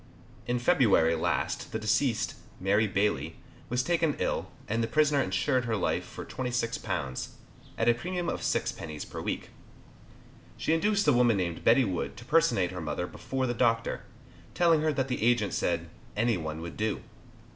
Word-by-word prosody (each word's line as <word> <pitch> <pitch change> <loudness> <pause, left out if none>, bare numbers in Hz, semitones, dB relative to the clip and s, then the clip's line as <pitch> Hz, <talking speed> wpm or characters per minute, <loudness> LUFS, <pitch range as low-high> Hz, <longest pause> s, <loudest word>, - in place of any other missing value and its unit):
In 120 0 +1
February 120 - +4
last 80 - -1
the - - -1
deceased, 110 +3 +1 0.3
Mary 100 +3 +2
Bailey, 95 -7 0 0.3
was 125 +2 +1
taken 165 -1 +1
ill, - - -1 0.2
and 115 +2 0
the 115 - 0
prisoner 150 +2 +3
insured 125 +6 +1
her 115 -1 0
life 100 - 0
for - - -9
£26, 115 - -2 0.5
at 115 - +1
a 120 - +7
premium 175 +7 -3
of - - -2
6d. 75 -2 -2
per - - -5
week. - - -4 1.1
She 155 - +1
induced 205 +3 +2
a 145 - +6
woman 120 -3 +4
named 85 -3 -2
Betty 120 +3 +5
Wood 95 -4 -3
to 120 - -10
personate 155 - +3
her 90 -1 -5
mother 80 +3 -2
before 130 +8 -3
the 120 - 0
doctor, 115 -1 +1 0.5
telling 165 -3 +4
her 155 0 +2
that 135 -2 -1
the 125 - -2
agent 115 -3 +2
said 85 -1 0 0.3
"Any 115 +1 +3
one 80 -2 -4
would 85 0 -7
do." 110 0 -1
115 Hz, 170 wpm, -29 LUFS, 95-135 Hz, 1.1 s, a